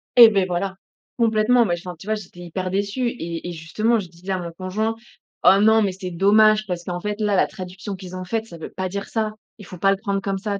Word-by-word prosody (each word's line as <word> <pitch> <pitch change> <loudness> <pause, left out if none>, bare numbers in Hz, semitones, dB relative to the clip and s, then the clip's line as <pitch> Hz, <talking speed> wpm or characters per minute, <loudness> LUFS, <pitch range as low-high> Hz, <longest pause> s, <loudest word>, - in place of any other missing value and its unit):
Et 235 -2 +11
beh, 195 -3 +2
voilà! 190 +2 -2 0.4
Complètement, 230 +1 +4
mais 175 -4 +1
enfin, 180 +1 -8
tu 190 - -12
vois 215 - +1
j'étais 185 -4 -10
hyper 185 +2 -4
déçue 200 +6 0
et 170 -7 -5
et - - -4
justement, 215 +8 0
je 190 - -6
disais 175 +3 -8
à 190 - +1
mon 170 -1 -5
conjoint: 195 +6 -2 0.5
«Oh 195 - +7
non, 220 +1 +5
mais 200 - +1
c'est 185 0 -7
dommage 215 +4 +4
parce 175 -2 -3
qu'en 175 0 -4
fait 210 +1 -3
là, 210 -2 +1
la 185 - +3
traduction 190 +2 -7
qu'ils 185 -1 -9
ont 185 - -5
faite, 220 +4 -2
ça 170 -7 -11
veut 160 - -7
pas 185 0 -3
dire 200 +2 -4
ça, 220 -2 -1 0.3
il 210 - -12
ne - - -13
faut 180 - -9
pas 195 +3 +3
le 195 - +1
prendre 200 -1 -2
comme 195 0 -2
ça», 200 0 -3
195 Hz, 260 wpm, -22 LUFS, 180-215 Hz, 0.5 s, Et